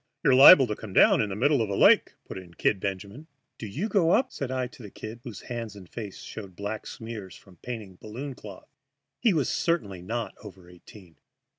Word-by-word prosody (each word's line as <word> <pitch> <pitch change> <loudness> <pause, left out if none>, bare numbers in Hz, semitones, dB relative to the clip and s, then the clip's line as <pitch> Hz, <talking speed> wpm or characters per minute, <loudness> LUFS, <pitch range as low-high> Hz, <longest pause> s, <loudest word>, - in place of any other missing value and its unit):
"You're 135 - +4
liable 135 +3 +9
to 105 -3 -3
come 105 -3 -10
down - - +5
in 105 - -1
the 95 - -4
middle 140 +4 +2
of 110 - -2
a 100 - -2
lake," - - +5
put - - -9
in 85 -2 -15
"Kid" 100 - +1
Benjamin. 100 - -6 0.3
"Do 110 - -6
you 150 - -3
go 195 -7 +2
up?" 260 +8 +2
said 135 - -5
I 130 -1 -1
to 125 - -12
the 105 - -9
"Kid," 110 +4 -9
whose 120 -7 -9
hands 115 -4 -6
and 95 -3 -12
face 105 -2 -8
showed 100 -4 -9
black 105 +3 -5
smears 110 -5 -8
from 95 -3 -18
painting 110 -7 -8
balloon 130 +6 -7
cloth. 105 -6 -13 0.5
He 235 - +3
was 150 -8 +1
certainly 105 - -1
not 115 +5 -4
over 95 -4 -12
eighteen. 90 0 -16
110 Hz, 210 wpm, -26 LUFS, 100-130 Hz, 0.5 s, liable